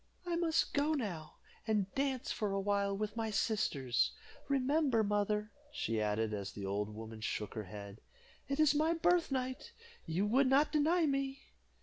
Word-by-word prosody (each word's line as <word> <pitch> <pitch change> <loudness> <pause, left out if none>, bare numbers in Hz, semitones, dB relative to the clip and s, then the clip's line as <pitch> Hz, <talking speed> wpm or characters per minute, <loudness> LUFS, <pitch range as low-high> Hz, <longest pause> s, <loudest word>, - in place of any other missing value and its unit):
"I 350 -1 -1
must 335 -2 +1
go 295 +2 +2
now, 195 - -4 0.3
and 205 -3 0
dance 270 -2 -1
for 210 -4 -1
a 195 - 0
while 200 0 0
with 210 +1 -3
my 225 -1 -1
sisters. 180 - +1 0.3
Remember, 275 -3 +2
mother," 210 +1 0 0.2
she 115 - -1
added, 105 +1 0
as 100 -1 -4
the 100 - -6
old 105 +2 -2
woman 110 0 -8
shook 105 -1 -3
her 110 -3 -4
head, 100 +1 -9 0.5
"it 275 +2 -2
is 310 -2 +5
my 315 +3 +2
birthnight 290 -7 0 0.3
you 175 +5 +1
would 260 +6 +4
not 280 +4 +4
deny 320 +3 +3
me." 275 -1 -1
215 Hz, 160 wpm, -34 LUFS, -, 0.5 s, is